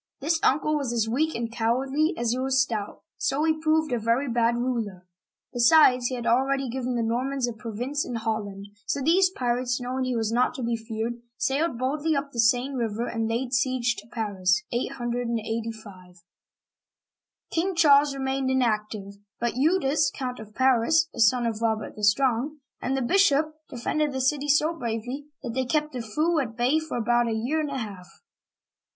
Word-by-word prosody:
This 320 Hz, +4 st, 0 dB
uncle 305 Hz, +3 st, +2 dB
was 275 Hz, -5 st, -2 dB
as 230 Hz, -2 st, 0 dB
weak 305 Hz, +8 st, 0 dB
and 230 Hz, -1 st, -3 dB
cowardly 265 Hz, +8 st, 0 dB
as 235 Hz, -1 st, 0 dB
he 250 Hz, -, -1 dB
was 265 Hz, 0 st, +1 dB
stout, 220 Hz, -6 st, -2 dB, 0.2 s
so 275 Hz, +2 st, 0 dB
he 315 Hz, -1 st, +1 dB
proved 315 Hz, -1 st, +2 dB
a 240 Hz, -, +1 dB
very 230 Hz, +5 st, +1 dB
bad 235 Hz, -1 st, +2 dB
ruler. 230 Hz, -7 st, -3 dB, 0.5 s
Besides, 250 Hz, 0 st, +5 dB
he 255 Hz, -, -3 dB
had 240 Hz, -1 st, -5 dB
already 265 Hz, +2 st, +1 dB
given 255 Hz, 0 st, -2 dB
the 235 Hz, -, 0 dB
Normans 250 Hz, +3 st, -1 dB
a 240 Hz, -, -3 dB
province 235 Hz, +6 st, -3 dB
in 245 Hz, -, -5 dB
Holland, 205 Hz, -3 st, -3 dB, 0.2 s
so -, -, -1 dB
these 350 Hz, +7 st, +4 dB
pirates, 245 Hz, -5 st, -1 dB
knowing 255 Hz, +1 st, -2 dB
he 255 Hz, -1 st, -1 dB
was 225 Hz, -1 st, -1 dB
not 245 Hz, +5 st, +1 dB
to 260 Hz, -, -5 dB
be 235 Hz, 0 st, 0 dB
feared, 225 Hz, +1 st, -4 dB, 0.2 s
sailed 275 Hz, 0 st, 0 dB
boldly 290 Hz, +5 st, 0 dB
up 280 Hz, 0 st, -2 dB
the 235 Hz, -, -6 dB
Seine 245 Hz, +4 st, +3 dB
River 230 Hz, -2 st, -2 dB
and 225 Hz, -2 st, -2 dB
laid 240 Hz, +3 st, -2 dB
siege 245 Hz, -1 st, +1 dB
to 215 Hz, -, -10 dB
Paris 205 Hz, -3 st, 0 dB
(885). 230 Hz, -6 st, -4 dB, 1.4 s
King 360 Hz, +3 st, 0 dB
Charles 285 Hz, -3 st, +5 dB
remained 265 Hz, 0 st, -1 dB
inactive, 215 Hz, -5 st, -1 dB, 0.2 s
but 240 Hz, 0 st, 0 dB
Eudes 295 Hz, 0 st, +2 dB
(ed), -, -, -15 dB
Count 250 Hz, -2 st, -4 dB
of 215 Hz, -1 st, -11 dB
Paris 265 Hz, +6 st, +3 dB
(a -, -, -9 dB
son 235 Hz, +2 st, +4 dB
of 225 Hz, -1 st, -2 dB
Robert 220 Hz, -1 st, -1 dB
the 210 Hz, -, -9 dB
Strong), 255 Hz, +6 st, +2 dB, 0.2 s
and 270 Hz, +1 st, -1 dB
the 265 Hz, -, 0 dB
bishop, 310 Hz, -1 st, +3 dB, 0.2 s
de 250 Hz, -, -8 dB
fended 300 Hz, +5 st, 0 dB
the 265 Hz, -, -2 dB
city 285 Hz, +2 st, +1 dB
so 300 Hz, +3 st, +3 dB
bravely 245 Hz, +1 st, -4 dB, 0.2 s
that 240 Hz, -3 st, -4 dB
they 260 Hz, +1 st, 0 dB
kept 300 Hz, +3 st, 0 dB
the 250 Hz, -, -3 dB
foe 310 Hz, +9 st, 0 dB
at 230 Hz, -5 st, -4 dB
bay 255 Hz, +6 st, +3 dB
for 315 Hz, -5 st, -5 dB
about 240 Hz, +1 st, +2 dB
a 225 Hz, -, -1 dB
year 245 Hz, +8 st, -1 dB
and 300 Hz, -, -3 dB
a 275 Hz, -, -3 dB
half. 200 Hz, -7 st, -7 dB
245 Hz, 185 wpm, -26 LUFS, 230-280 Hz, 1.4 s, Besides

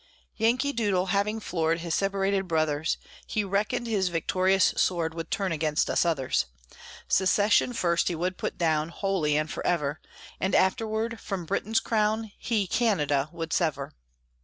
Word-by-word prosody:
Yankee 250 Hz, +6 st, +1 dB
Doodle, 205 Hz, -6 st, +1 dB
having 210 Hz, +2 st, +1 dB
floored 165 Hz, -4 st, -1 dB
His 170 Hz, -1 st, -3 dB
separated 195 Hz, -1 st, 0 dB
brothers, 155 Hz, -2 st, 0 dB, 0.3 s
He 215 Hz, -, 0 dB
reckoned 210 Hz, +5 st, -1 dB
his 200 Hz, -5 st, 0 dB
victorious 185 Hz, +3 st, +2 dB
sword 170 Hz, -3 st, +1 dB
Would 165 Hz, 0 st, -6 dB
turn 195 Hz, -3 st, -1 dB
against 155 Hz, -1 st, 0 dB
us -, -, +2 dB
others; 150 Hz, -6 st, 0 dB, 0.6 s
Secession 205 Hz, +5 st, +3 dB
first 170 Hz, -7 st, +1 dB
he 175 Hz, -, 0 dB
would 180 Hz, +3 st, -2 dB
put -, -, -3 dB
down, 160 Hz, -2 st, +1 dB
Wholly 170 Hz, -5 st, 0 dB
and 155 Hz, 0 st, 0 dB
forever, 150 Hz, -3 st, -1 dB, 0.4 s
And 190 Hz, -, 0 dB
afterward, 220 Hz, +3 st, +1 dB
from 195 Hz, -4 st, -4 dB
Britain's 205 Hz, +5 st, 0 dB
crown, 220 Hz, 0 st, 0 dB
He 220 Hz, -4 st, 0 dB
Canada 155 Hz, -, +1 dB
would 165 Hz, -1 st, -5 dB
sever. 150 Hz, -5 st, -1 dB
185 Hz, 145 wpm, -27 LUFS, 165-210 Hz, 0.6 s, Secession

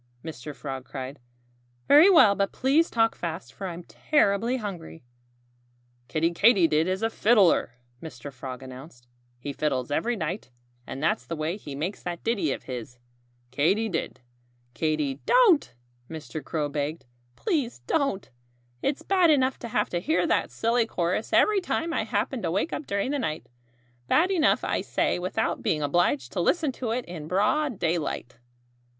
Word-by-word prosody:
Mr. 150 Hz, -2 st, -7 dB
Frog 135 Hz, 0 st, -6 dB
cried. 135 Hz, +1 st, -7 dB, 0.7 s
"Very 305 Hz, +7 st, +8 dB
well! 320 Hz, -, +7 dB
But 200 Hz, -1 st, 0 dB
please 285 Hz, +6 st, +2 dB
talk 225 Hz, -1 st, +2 dB
fast; 160 Hz, -7 st, -6 dB
for 190 Hz, -, -6 dB
I'm 175 Hz, 0 st, -7 dB
terribly 230 Hz, -, +1 dB
hungry." 180 Hz, -, -7 dB, 1.0 s
"Kiddie 165 Hz, +2 st, 0 dB
Katydid 170 Hz, -5 st, +4 dB
is 190 Hz, +3 st, -1 dB
a 225 Hz, -, +2 dB
fiddler," 205 Hz, -, +3 dB, 0.3 s
Mr. 140 Hz, -3 st, -9 dB
Frog 130 Hz, +1 st, -7 dB
announced. 130 Hz, -1 st, -12 dB, 0.3 s
"He 140 Hz, +4 st, -6 dB
fiddles 135 Hz, -4 st, -1 dB
every 235 Hz, +11 st, 0 dB
night. 175 Hz, -, -4 dB, 0.4 s
And 135 Hz, -, -6 dB
that's 125 Hz, -6 st, 0 dB
the 165 Hz, -, -3 dB
way 155 Hz, +3 st, -2 dB
he 150 Hz, -9 st, -8 dB
makes 165 Hz, +8 st, -4 dB
that 175 Hz, -1 st, -5 dB
ditty 200 Hz, -, 0 dB
of -, -, -4 dB
his 125 Hz, -1 st, -7 dB, 0.5 s
Katy 195 Hz, -, +1 dB
did, 165 Hz, -7 st, -4 dB, 0.5 s
Katy 150 Hz, 0 st, -1 dB
" -, -, -35 dB
"Don't!" 425 Hz, -, +4 dB, 0.3 s
Mr. 155 Hz, -1 st, -7 dB
Crow 155 Hz, -3 st, -2 dB
begged. 145 Hz, +2 st, -3 dB, 0.3 s
"Please 280 Hz, -, -2 dB
don't! 275 Hz, -, 0 dB, 0.5 s
It's 275 Hz, 0 st, -1 dB
bad 370 Hz, -3 st, +3 dB
enough 265 Hz, -3 st, +2 dB
to 235 Hz, -, -6 dB
have 210 Hz, -2 st, -1 dB
to 175 Hz, -, 0 dB
hear 315 Hz, -, +1 dB
that -, -, +1 dB
silly 230 Hz, 0 st, +1 dB
chorus 180 Hz, +2 st, -1 dB
every 420 Hz, -2 st, +4 dB
time 335 Hz, -2 st, -2 dB
I 220 Hz, -, 0 dB
happen 230 Hz, +3 st, -1 dB
to 170 Hz, -, -1 dB
wake 195 Hz, -, -1 dB
up 300 Hz, -, -5 dB
during 200 Hz, +6 st, -1 dB
the 290 Hz, -, -1 dB
night 155 Hz, -10 st, -3 dB, 0.6 s
bad 350 Hz, -, +3 dB
enough, 330 Hz, -5 st, +3 dB
I -, -, 0 dB
say, -, -, 0 dB
without 185 Hz, +1 st, -1 dB
being 150 Hz, -1 st, 0 dB
obliged 145 Hz, -4 st, +1 dB
to -, -, -3 dB
listen 310 Hz, -, +1 dB
to 250 Hz, -2 st, -5 dB
it 240 Hz, +2 st, -2 dB
in 165 Hz, -4 st, -8 dB
broad 210 Hz, -, +1 dB
daylight." 160 Hz, -8 st, -2 dB
180 Hz, 165 wpm, -26 LUFS, 150-240 Hz, 1.0 s, Very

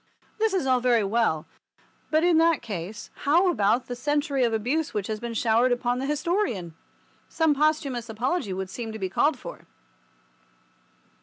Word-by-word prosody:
This 440 Hz, -2 st, +2 dB
is 365 Hz, -, 0 dB
all 255 Hz, -1 st, +3 dB
very 240 Hz, -3 st, +3 dB
well, 195 Hz, -7 st, +1 dB, 0.6 s
but 310 Hz, +1 st, +2 dB
in 345 Hz, -2 st, +4 dB
that 330 Hz, -1 st, +3 dB
case 205 Hz, 0 st, -6 dB
how 345 Hz, +6 st, +3 dB
about 215 Hz, -2 st, +1 dB
the 245 Hz, -, -5 dB
century 285 Hz, +1 st, 0 dB
of 235 Hz, -, +2 dB
abuse 250 Hz, +8 st, -1 dB
which 205 Hz, -2 st, -1 dB
has 215 Hz, 0 st, -4 dB
been 235 Hz, 0 st, -5 dB
showered 230 Hz, +3 st, +3 dB
upon 245 Hz, 0 st, 0 dB
the 270 Hz, -, -2 dB
historian? 300 Hz, -, -1 dB, 0.6 s
Some 320 Hz, -2 st, +2 dB
posthumous 285 Hz, -5 st, 0 dB
apology 230 Hz, -, -1 dB
would 190 Hz, 0 st, -4 dB
seem 230 Hz, -2 st, -5 dB
to -, -, -5 dB
be 190 Hz, -3 st, -3 dB
called 290 Hz, +9 st, +2 dB
for. -, -, -10 dB
245 Hz, 165 wpm, -26 LUFS, 220-310 Hz, 0.6 s, in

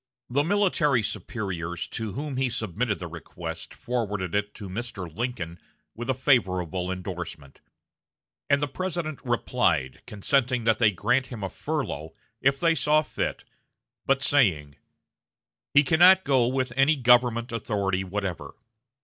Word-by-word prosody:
The 140 Hz, +3 st, +2 dB
military 165 Hz, -, +2 dB
superiors 90 Hz, -5 st, -4 dB
to 110 Hz, -3 st, -4 dB
whom 140 Hz, -1 st, -4 dB
he 130 Hz, -1 st, +1 dB
submitted 110 Hz, -1 st, -1 dB
the 90 Hz, -, -7 dB
request 85 Hz, -2 st, -7 dB
forwarded 105 Hz, -7 st, -3 dB
it 105 Hz, 0 st, -1 dB
to 105 Hz, -, -8 dB
Mr. 110 Hz, 0 st, -5 dB
Lincoln 100 Hz, -8 st, -4 dB, 0.3 s
with 120 Hz, +2 st, -7 dB
a 130 Hz, -, +2 dB
favorable 95 Hz, -, +1 dB
indorsement; 90 Hz, -6 st, -6 dB, 0.9 s
and 140 Hz, 0 st, +3 dB
the -, -, +1 dB
President 170 Hz, -2 st, -4 dB
replied, 115 Hz, -, 0 dB
consenting 125 Hz, +3 st, +1 dB
that 110 Hz, -1 st, +2 dB
they 115 Hz, -3 st, +6 dB
grant 125 Hz, +7 st, +1 dB
him 115 Hz, -5 st, -7 dB
a 95 Hz, -, -3 dB
furlough, 80 Hz, -, -4 dB, 0.3 s
if 135 Hz, +1 st, +2 dB
they 165 Hz, -1 st, +4 dB
saw 155 Hz, -1 st, +3 dB
fit, -, -, -3 dB, 0.6 s
but 135 Hz, 0 st, +2 dB
saying: 80 Hz, -, +2 dB, 1.0 s
"He 145 Hz, -, +6 dB
cannot 180 Hz, +6 st, +6 dB
go 130 Hz, -4 st, +3 dB
with 130 Hz, -1 st, -1 dB
any 135 Hz, +4 st, +4 dB
government 120 Hz, -2 st, +3 dB
authority 100 Hz, -4 st, -1 dB
whatever. 95 Hz, -1 st, -4 dB
120 Hz, 135 wpm, -26 LUFS, 95-135 Hz, 1.0 s, they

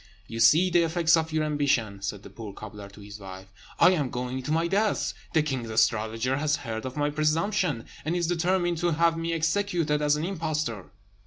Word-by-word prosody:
"You 115 Hz, +1 st, -7 dB
see 165 Hz, +10 st, +5 dB
the 175 Hz, 0 st, +4 dB
effects 165 Hz, 0 st, +3 dB
of 160 Hz, -1 st, -1 dB
your 155 Hz, 0 st, +1 dB
ambition," 140 Hz, -9 st, 0 dB
said 100 Hz, +1 st, -4 dB
the -, -, -12 dB
poor 110 Hz, -4 st, -8 dB
cobbler 105 Hz, -1 st, -9 dB
to 100 Hz, +1 st, -15 dB
his 100 Hz, +1 st, -10 dB
wife; 95 Hz, 0 st, -10 dB, 0.3 s
"I 175 Hz, -, +7 dB
am 150 Hz, -8 st, 0 dB
going 125 Hz, +1 st, -4 dB
to 130 Hz, -, -4 dB
my 165 Hz, +2 st, +2 dB
death. 205 Hz, +4 st, 0 dB, 0.2 s
The 160 Hz, -3 st, +3 dB
king's 130 Hz, -6 st, -3 dB
astrologer 110 Hz, +3 st, +1 dB
has 150 Hz, 0 st, +1 dB
heard 110 Hz, +2 st, -4 dB
of 130 Hz, -, -8 dB
my 145 Hz, 0 st, +1 dB
presumption, 155 Hz, -, 0 dB, 0.2 s
and 160 Hz, +3 st, -1 dB
is 175 Hz, -1 st, 0 dB
determined 175 Hz, 0 st, 0 dB
to 175 Hz, -1 st, +1 dB
have 165 Hz, +1 st, +3 dB
me 165 Hz, 0 st, -2 dB
executed 165 Hz, -2 st, 0 dB
as 150 Hz, 0 st, +3 dB
an 150 Hz, +2 st, -2 dB
impostor." 155 Hz, -, -3 dB
150 Hz, 200 wpm, -27 LUFS, 115-165 Hz, 0.3 s, I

